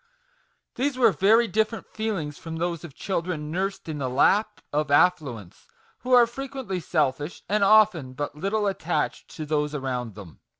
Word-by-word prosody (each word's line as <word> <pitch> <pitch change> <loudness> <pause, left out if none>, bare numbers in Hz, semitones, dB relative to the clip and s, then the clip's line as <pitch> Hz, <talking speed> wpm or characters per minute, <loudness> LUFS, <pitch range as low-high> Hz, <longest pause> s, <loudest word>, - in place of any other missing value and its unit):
These 265 +1 0
were 235 -4 +5
very 215 +7 +4
different 220 +3 -1
feelings 195 -10 -4
from 165 -1 -7
those 170 0 -2
of 155 -6 -10
children 165 -5 -3
nursed 190 +2 -3
in 155 -2 -4
the 130 -2 -2
lap 210 +11 +2
of 150 0 0
affluence, 140 - +1 0.3
who 250 - -6
are 245 -1 +8
frequently 255 -5 -5
selfish, 150 -2 -1
and 210 0 +1
often 195 -10 +4
but 145 +2 -4
little 200 +6 -1
attached 185 -4 -2
to 155 - -5
those 150 0 -1
around 125 -6 -3
them. 95 -7 -12
175 Hz, 160 wpm, -25 LUFS, 150-215 Hz, 0.3 s, are